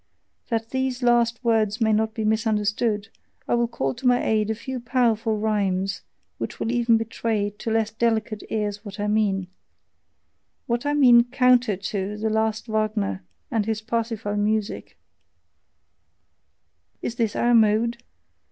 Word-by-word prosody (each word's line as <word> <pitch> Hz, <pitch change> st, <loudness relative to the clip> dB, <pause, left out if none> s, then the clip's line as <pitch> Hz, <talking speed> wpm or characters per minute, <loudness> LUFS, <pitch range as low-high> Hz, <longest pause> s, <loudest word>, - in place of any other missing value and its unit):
That 225 Hz, -1 st, -2 dB
these 260 Hz, -1 st, -2 dB
last 240 Hz, 0 st, +2 dB
words 220 Hz, -2 st, +1 dB
may 220 Hz, -2 st, +3 dB
not 220 Hz, +1 st, 0 dB
be 220 Hz, -2 st, -2 dB
misunderstood, 215 Hz, 0 st, 0 dB, 0.4 s
I -, -, 0 dB
will 235 Hz, 0 st, +2 dB
call 235 Hz, -, -2 dB
to 250 Hz, +1 st, -3 dB
my 245 Hz, 0 st, +3 dB
aid 215 Hz, -1 st, +1 dB
a 220 Hz, -, 0 dB
few 260 Hz, +3 st, -5 dB
powerful 230 Hz, -3 st, +1 dB
rhymes, 195 Hz, -3 st, -1 dB, 0.4 s
which -, -, -5 dB
will 225 Hz, -, -1 dB
even 235 Hz, -1 st, +3 dB
betray 225 Hz, -2 st, -2 dB
to -, -, -4 dB
less 225 Hz, -1 st, +1 dB
delicate 220 Hz, -1 st, -1 dB
ears 210 Hz, -1 st, -2 dB
what 205 Hz, -1 st, -9 dB
I 205 Hz, -, -1 dB
mean 210 Hz, -3 st, +1 dB, 1.2 s
what 240 Hz, +4 st, -1 dB
I 290 Hz, -, +1 dB
mean 245 Hz, -4 st, +6 dB
COUNTER 250 Hz, -4 st, +3 dB
TO 200 Hz, +1 st, -4 dB
the 220 Hz, +1 st, -1 dB
"last 220 Hz, 0 st, 0 dB
Wagner" 215 Hz, -, -1 dB, 0.3 s
and 220 Hz, -2 st, 0 dB
his 220 Hz, -1 st, -1 dB
Parsifal 225 Hz, -2 st, -2 dB
music: 210 Hz, 0 st, -2 dB, 2.1 s
Is -, -, -2 dB
this 225 Hz, -3 st, 0 dB
our 240 Hz, 0 st, +2 dB
mode? 225 Hz, +1 st, +3 dB
220 Hz, 145 wpm, -24 LUFS, 210-235 Hz, 2.1 s, mean